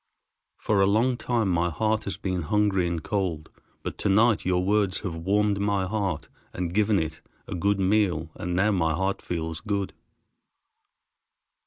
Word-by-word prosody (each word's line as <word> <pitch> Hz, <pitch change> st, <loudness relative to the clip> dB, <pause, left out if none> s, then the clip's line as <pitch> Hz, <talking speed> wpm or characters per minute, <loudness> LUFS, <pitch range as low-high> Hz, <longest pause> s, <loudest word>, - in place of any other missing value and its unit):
For 105 Hz, -2 st, +1 dB
a 95 Hz, -, +5 dB
long 115 Hz, +5 st, +3 dB
time 120 Hz, -3 st, 0 dB
my 85 Hz, -1 st, +2 dB
heart 110 Hz, +7 st, 0 dB
has 100 Hz, -, -3 dB
been 95 Hz, -2 st, -2 dB
hungry 95 Hz, +1 st, +1 dB
and 85 Hz, -2 st, -3 dB
cold, 90 Hz, -7 st, -2 dB, 0.3 s
but -, -, -5 dB
to -, -, 0 dB
night 110 Hz, +3 st, +4 dB
your 90 Hz, 0 st, +1 dB
words 100 Hz, -2 st, +1 dB
have 95 Hz, -5 st, -3 dB
warmed 100 Hz, +4 st, +1 dB
my 100 Hz, -2 st, +1 dB
heart, 95 Hz, -5 st, -2 dB, 0.3 s
and 90 Hz, -1 st, -3 dB
given 105 Hz, +1 st, +3 dB
it 80 Hz, -2 st, -3 dB, 0.3 s
a -, -, -5 dB
good 100 Hz, +3 st, +1 dB
meal, 95 Hz, -5 st, +1 dB
and 90 Hz, 0 st, -4 dB
now 100 Hz, +4 st, +3 dB
my 80 Hz, -5 st, +1 dB
heart 95 Hz, +4 st, -1 dB
feels 80 Hz, -1 st, -4 dB
good." 100 Hz, -2 st, -2 dB
95 Hz, 165 wpm, -26 LUFS, 85-105 Hz, 0.3 s, a